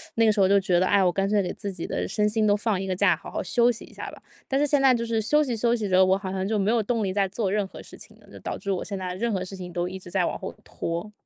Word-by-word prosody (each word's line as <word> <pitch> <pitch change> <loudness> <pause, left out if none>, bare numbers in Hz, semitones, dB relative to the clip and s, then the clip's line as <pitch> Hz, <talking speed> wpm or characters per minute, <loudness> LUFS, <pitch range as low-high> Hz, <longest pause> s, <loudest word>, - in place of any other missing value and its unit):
那 230 - +4
个 220 - +5
时 210 - -1
候 190 - +5
就 200 +1 +5
觉 185 -3 +2
得， 185 - +3
哎， 195 0 +3
我 180 - +3
干 195 +2 0
脆 205 0 +2
给 180 - -3
自 200 - -5
己 170 - -5
的 - - -2
身 210 +1 +1
心 220 0 +1
都 205 -1 +4
放 210 -2 0
一 195 - -3
个 185 - -2
假， - - +4
好 - - -11
好 - - -2
休 240 0 +3
息 230 - -7
一 - - -18
下 - - -7
吧。 - - -14 0.3
但 270 - 0
是 295 - +2
现 290 0 +3
在 265 -2 +5
就 235 -1 -1
是 230 -1 0
休 300 +8 +3
息 245 -5 -2
休 235 +2 +2
息 215 -4 -3
着， 185 0 +5
我 185 - +3
好 190 -2 -5
像 190 0 -2
就 220 -1 0
没 195 +1 +1
有 230 -1 +2
动 225 0 -1
力 190 - -1
再 195 0 +1
做 195 0 -2
任 205 0 +1
何 - - -11
事 - - -12
情 - - -12
了， - - -21
就 - - -11
导 - - -5
致 200 - -13
我 185 - -1
现 200 -2 -5
在 180 -1 -4
任 230 +4 -1
何 185 -2 -1
事 195 +1 -8
情 180 -1 -8
都 175 0 -2
一 190 +1 -6
直 175 -1 -11
在 185 -1 +1
往 - - -2
后 - - -6
拖。 170 +5 -5
200 Hz, 385 characters per minute, -25 LUFS, 185-225 Hz, 0.3 s, 个